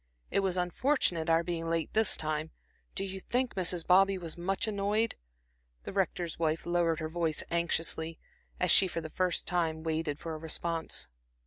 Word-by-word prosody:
It -, -, +2 dB
was 190 Hz, -2 st, 0 dB
unfortunate 180 Hz, -, +1 dB
our 165 Hz, +1 st, +4 dB
being 165 Hz, -1 st, -3 dB
late 165 Hz, -1 st, -1 dB
this 220 Hz, 0 st, +3 dB
time. 155 Hz, 0 st, -2 dB, 0.5 s
Do -, -, -2 dB
you 190 Hz, 0 st, -5 dB
think 250 Hz, +5 st, -1 dB
Mrs. 180 Hz, -2 st, 0 dB
Bobby 195 Hz, +2 st, +5 dB
was 170 Hz, -3 st, -6 dB
much 190 Hz, +5 st, -1 dB
annoyed?" 210 Hz, +2 st, +1 dB, 0.7 s
The -, -, -7 dB
Rector's 180 Hz, -4 st, -1 dB
wife 160 Hz, -1 st, 0 dB
lowered 170 Hz, -2 st, +1 dB
her 155 Hz, -, -2 dB
voice 160 Hz, -1 st, -1 dB
anxiously, 165 Hz, -1 st, 0 dB, 0.4 s
as 180 Hz, -2 st, +5 dB
she 190 Hz, -, +8 dB
for 170 Hz, -, -3 dB
the 160 Hz, -1 st, -8 dB
first 185 Hz, -2 st, +1 dB
time 165 Hz, -3 st, -1 dB
waited 160 Hz, -2 st, -1 dB
for 165 Hz, 0 st, -6 dB
a 155 Hz, -, -6 dB
response. 165 Hz, -, -2 dB
170 Hz, 175 wpm, -31 LUFS, 160-190 Hz, 0.7 s, she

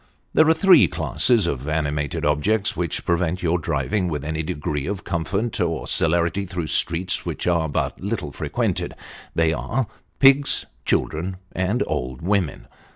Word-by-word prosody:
There 160 Hz, 0 st, +5 dB
are -, -, +7 dB
three 195 Hz, 0 st, +6 dB
classes 120 Hz, -6 st, +2 dB
of 70 Hz, -4 st, -3 dB
animated 75 Hz, -2 st, -1 dB
objects 95 Hz, +8 st, +1 dB
which 85 Hz, -3 st, -2 dB
prevent 90 Hz, +1 st, 0 dB
your 85 Hz, +1 st, +2 dB
driving 95 Hz, +4 st, -1 dB
with 75 Hz, -4 st, -3 dB
any 80 Hz, 0 st, -2 dB
degree 75 Hz, -2 st, -3 dB
of 100 Hz, -1 st, -4 dB
comfort 95 Hz, +7 st, -2 dB
or 85 Hz, -3 st, -1 dB
celerity 85 Hz, +4 st, +1 dB
through 90 Hz, -2 st, -3 dB
streets 90 Hz, +2 st, +2 dB
which -, -, -4 dB
are 85 Hz, -3 st, +1 dB
but -, -, -2 dB
little 100 Hz, -7 st, -3 dB
frequented -, -, -2 dB, 0.4 s
they 80 Hz, -1 st, +3 dB
are 125 Hz, +9 st, -1 dB, 0.3 s
pigs, 135 Hz, +1 st, +4 dB, 0.2 s
children, 90 Hz, +4 st, -1 dB
and 95 Hz, +6 st, 0 dB
old 65 Hz, +3 st, -4 dB
women. 95 Hz, -6 st, 0 dB
85 Hz, 150 wpm, -23 LUFS, 80-100 Hz, 0.4 s, are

